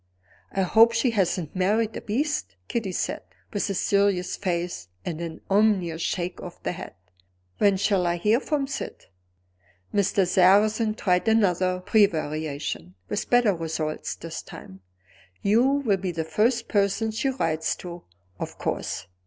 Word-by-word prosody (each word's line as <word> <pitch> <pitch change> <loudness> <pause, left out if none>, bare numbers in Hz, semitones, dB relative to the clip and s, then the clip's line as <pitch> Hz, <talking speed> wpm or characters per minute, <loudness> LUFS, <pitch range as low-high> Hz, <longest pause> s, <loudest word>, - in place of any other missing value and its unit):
"I 195 - 0
hope 225 +5 +6
she 230 +2 +2
hasn't 185 -6 0
married 210 +4 +1
a - - -4
beast," 215 - -2
Kitty 220 -5 -2
said, - - -2 0.3
with 205 - -1
a 195 - -1
serious 200 -2 +1
face 175 - -3 0.2
and 165 -1 -4
an 165 -1 -6
ominous 195 -5 +2
shake 175 +1 -2
of 180 - -8
the - - -1
head. 180 - -8 0.6
"When 200 -2 +4
shall 190 -2 +2
I 170 - +1
hear 210 +7 +3
from 290 -1 -1
Syd?" 270 0 -6 0.9
Mr. 200 -2 +2
Sarrazin 210 +4 +4
tried 180 -1 +1
another 185 -4 +2
prevarication 155 - 0
with 205 - -2
better 245 -4 +4
results 160 -2 -3
this - - -7
time. 95 0 -11 0.6
"You 210 +4 +4
will 270 -7 +2
be 185 -1 -3
the 165 -1 -3
first 230 +8 +1
person 205 +2 +1
she 220 +5 0
writes 160 -11 -1
to, 175 -1 -9 0.4
of - - -5
course." - - -3
195 Hz, 145 wpm, -25 LUFS, 170-220 Hz, 0.9 s, hope